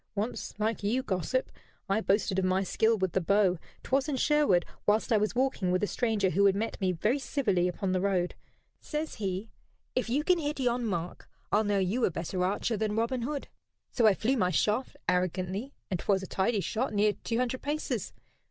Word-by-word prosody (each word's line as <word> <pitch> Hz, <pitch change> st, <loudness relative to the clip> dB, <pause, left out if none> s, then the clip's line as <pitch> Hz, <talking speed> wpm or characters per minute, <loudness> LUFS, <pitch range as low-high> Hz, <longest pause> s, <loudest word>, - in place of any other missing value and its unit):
"Once, 215 Hz, +4 st, -3 dB
like 215 Hz, +1 st, -1 dB
you, 230 Hz, +6 st, 0 dB
gossip, 195 Hz, +7 st, -1 dB, 0.4 s
I 200 Hz, +3 st, +1 dB
boasted 195 Hz, -2 st, +1 dB
of 190 Hz, -, +1 dB
my 185 Hz, +1 st, +2 dB
skill 220 Hz, +4 st, +2 dB
with 190 Hz, -3 st, 0 dB
the 190 Hz, -, +1 dB
bow 185 Hz, 0 st, +3 dB, 0.2 s
'twas 270 Hz, +3 st, +1 dB
in 285 Hz, -, 0 dB
Sherwood, 285 Hz, -, +3 dB, 0.2 s
whilst 215 Hz, +3 st, +2 dB
I -, -, +5 dB
was 210 Hz, +2 st, 0 dB
walking 255 Hz, -7 st, +1 dB
with 185 Hz, +2 st, +1 dB
a -, -, +5 dB
stranger 210 Hz, -4 st, 0 dB
who 200 Hz, +5 st, +2 dB
had 195 Hz, -, +3 dB
met 220 Hz, +1 st, -3 dB
me 185 Hz, -1 st, +2 dB
very 215 Hz, -, 0 dB
civilly 200 Hz, -11 st, +1 dB
upon 180 Hz, +2 st, -2 dB
the 185 Hz, -1 st, +1 dB
road. 185 Hz, -3 st, +1 dB, 0.5 s
Says 305 Hz, 0 st, -4 dB
he: 195 Hz, +2 st, -3 dB, 0.4 s
'If 255 Hz, -2 st, -1 dB
you 280 Hz, +5 st, +1 dB
can 360 Hz, +1 st, +3 dB
hit 295 Hz, -2 st, -2 dB
yon 245 Hz, -2 st, +1 dB
mark 175 Hz, -3 st, -4 dB, 0.2 s
I'll 210 Hz, +2 st, +4 dB
know 205 Hz, -1 st, +1 dB
you 195 Hz, +6 st, 0 dB
a -, -, +2 dB
better 180 Hz, +2 st, -3 dB
archer 205 Hz, +4 st, 0 dB
than 215 Hz, 0 st, -1 dB
Robin 235 Hz, +3 st, 0 dB
Hood.' 280 Hz, +4 st, -3 dB, 0.4 s
So 235 Hz, -3 st, +4 dB
I 205 Hz, -, +5 dB
flew 255 Hz, +7 st, +1 dB
my 180 Hz, -5 st, +2 dB
shaft 210 Hz, +7 st, 0 dB
arrogantly, 185 Hz, +6 st, -1 dB, 0.2 s
and 180 Hz, -, 0 dB
'twas 195 Hz, +1 st, +1 dB
a -, -, -6 dB
tidy 200 Hz, +2 st, +1 dB
shot, 225 Hz, +2 st, -2 dB
near 205 Hz, +1 st, +3 dB
two 230 Hz, -, -1 dB
hundred 255 Hz, +1 st, -1 dB
paces. 295 Hz, +2 st, -2 dB
210 Hz, 205 wpm, -29 LUFS, 190-245 Hz, 0.5 s, I